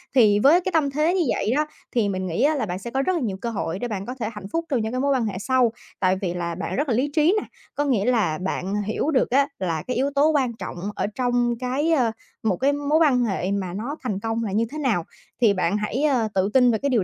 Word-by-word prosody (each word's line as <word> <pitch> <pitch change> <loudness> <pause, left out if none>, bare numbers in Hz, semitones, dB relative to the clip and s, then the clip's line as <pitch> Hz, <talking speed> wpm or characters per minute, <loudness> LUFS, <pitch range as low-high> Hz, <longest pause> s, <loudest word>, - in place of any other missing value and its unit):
Thì 210 -5 +5
với 310 +10 +5
cái 375 +1 -2
tâm 310 -4 +2
thế 305 +5 +1
như 370 - +2
vậy 210 - -1
đó, 300 +1 +2 0.3
thì 225 -5 +1
mình 185 -1 -2
nghĩ 170 +5 -1
á 305 +2 +3
là 260 -6 -1
bạn 180 -2 -4
sẽ 235 +5 -7
có 265 - 0
rất 370 +7 +1
là 330 - -1
nhiều 200 -5 -2
cơ 235 - -2
hội 190 -5 -3
để 245 - -2
bạn 200 -3 -4
có 250 - -5
thể 220 - -2
hạnh 210 -2 -8
phúc 335 0 -1
trong 260 -6 +1
những 220 +1 -2
cái 255 - -1
mối 280 0 +2
quan 255 -4 +1
hệ 200 -3 -3
sau, 250 +1 +2 0.3
tại 185 -1 +3
vì 175 -2 -1
là 170 -1 -3
bạn 185 - -4
rất 290 +1 -1
là 230 - +2
lý 265 +4 +1
trí 320 +6 +4
nè. - - -10 0.3
Có 290 - 0
nghĩa 235 -8 +1
là 220 -11 +2
bạn 190 +2 -2
hiểu 220 +9 -1
được 260 - +2
á 275 +3 +3
là 165 -4 -2
cái 250 - -2
yếu 270 +3 +1
tố 285 +2 +5
quan 265 -6 +1
trọng 190 -5 -7 0.2
ở - - -1
trong 245 -1 +1
cái, 265 +6 0
a, 250 -8 +3 0.3
một 205 -5 +1
cái 280 +2 +2
mối 290 +2 +1
quan 265 -6 +4
hệ 195 -3 -1
mà 190 -3 -2
nó 240 +9 -4
thành 210 -6 -2
công 225 +2 -2
là 210 - -3
như 220 +4 +1
thế 305 - -6
nào? 245 - 0 0.4
Thì 220 -4 +5
bạn 185 +1 0
hãy, 210 +6 -2
ơ, 260 -7 +2
tự 195 +1 +1
tin 250 -2 +5
về 220 - +1
cái 280 +5 -1
điều 235 -7 +2
240 Hz, 290 wpm, -23 LUFS, 200-280 Hz, 0.4 s, Thì